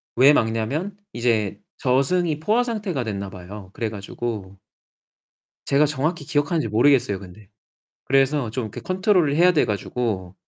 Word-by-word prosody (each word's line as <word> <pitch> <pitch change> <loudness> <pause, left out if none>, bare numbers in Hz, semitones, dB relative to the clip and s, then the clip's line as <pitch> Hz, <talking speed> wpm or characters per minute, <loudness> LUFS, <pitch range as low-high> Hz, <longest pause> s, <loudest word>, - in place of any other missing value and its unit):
왜 135 +4 +7
막냐면 130 - -1 0.2
이제 110 -4 0 0.2
저승이 150 +5 +1
포화 215 +10 +2
상태가 210 - -2
됐나 100 -3 -4
봐요. 95 +1 -10
그래 115 - -2
가지고 100 -1 -6 1.1
제가 140 +2 +3
정확히 150 +2 -2
기억하는지 150 -1 0
모르겠어요, 115 -2 +3
근데. 100 +2 -13 0.6
그래서 135 -2 +2
좀 125 +2 -3
이렇게 110 - -7
컨트롤을 185 -5 +2
해야 180 +2 +5
돼 160 - +3
가지고 105 -3 -3
130 Hz, 325 characters per minute, -23 LUFS, 105-155 Hz, 1.1 s, 왜